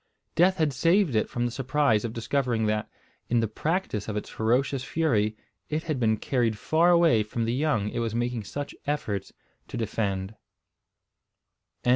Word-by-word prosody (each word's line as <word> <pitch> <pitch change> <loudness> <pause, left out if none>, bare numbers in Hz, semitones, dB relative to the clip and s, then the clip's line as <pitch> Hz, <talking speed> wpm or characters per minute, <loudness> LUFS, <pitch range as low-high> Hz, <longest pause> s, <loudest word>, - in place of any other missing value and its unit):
Death 185 +3 +4
had 155 -4 +1
saved 165 +5 +3
it 110 - +1
from 120 0 -1
the 120 - -1
surprise 135 -3 +1
of 115 - -2
discovering 115 -1 0
that, 105 0 -1 0.4
in 120 - +3
the 115 - +1
practice 150 - -2
of 105 -1 -2
its 105 - -4
ferocious 125 +4 +1
fury, 110 -9 +1 0.3
it 155 +1 -1
had 155 -5 -2
been 110 -2 +2
carried 115 -2 0
far 165 +9 +3
away 170 -10 +5
from 115 +2 -2
the 115 - 0
young 130 -7 +1
it - - -3
was 115 -1 -2
making 120 -1 -1
such 145 +7 -5
efforts 110 -10 -2 0.4
to - - -6
defend. 100 -3 -2
120 Hz, 165 wpm, -27 LUFS, 110-150 Hz, 0.4 s, away